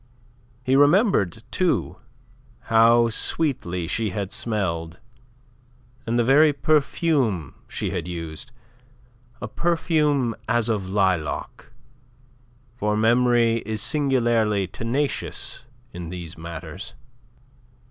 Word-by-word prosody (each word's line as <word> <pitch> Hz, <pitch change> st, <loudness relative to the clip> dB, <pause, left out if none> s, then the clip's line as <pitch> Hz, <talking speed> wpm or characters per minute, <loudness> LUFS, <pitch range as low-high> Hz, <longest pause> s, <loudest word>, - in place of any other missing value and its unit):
He 130 Hz, +1 st, +2 dB
remembered, 145 Hz, -, +3 dB
too, 185 Hz, -2 st, 0 dB, 0.8 s
how 115 Hz, +1 st, +6 dB
sweetly 110 Hz, -, -1 dB
she 110 Hz, +6 st, -1 dB
had 100 Hz, 0 st, -4 dB
smelled 85 Hz, -7 st, -2 dB, 1.1 s
and 115 Hz, +1 st, 0 dB
the 120 Hz, -, +3 dB
very 145 Hz, +5 st, +5 dB
perfume 140 Hz, -, +1 dB
she -, -, -3 dB
had 85 Hz, -, -3 dB
used, 85 Hz, -, -6 dB, 0.9 s
a -, -, -4 dB
perfume 150 Hz, -7 st, +1 dB, 0.2 s
as 120 Hz, -1 st, +2 dB
of 100 Hz, -4 st, -1 dB
lilac 95 Hz, -6 st, -1 dB, 1.0 s
for 105 Hz, -2 st, -1 dB
memory 120 Hz, 0 st, +3 dB
is 110 Hz, -1 st, -4 dB
singularly 120 Hz, -7 st, +1 dB
tenacious 125 Hz, +6 st, -3 dB, 0.3 s
in 85 Hz, -2 st, -7 dB
these 90 Hz, -1 st, -7 dB
matters. 85 Hz, +5 st, -8 dB
115 Hz, 95 wpm, -23 LUFS, 90-135 Hz, 1.1 s, how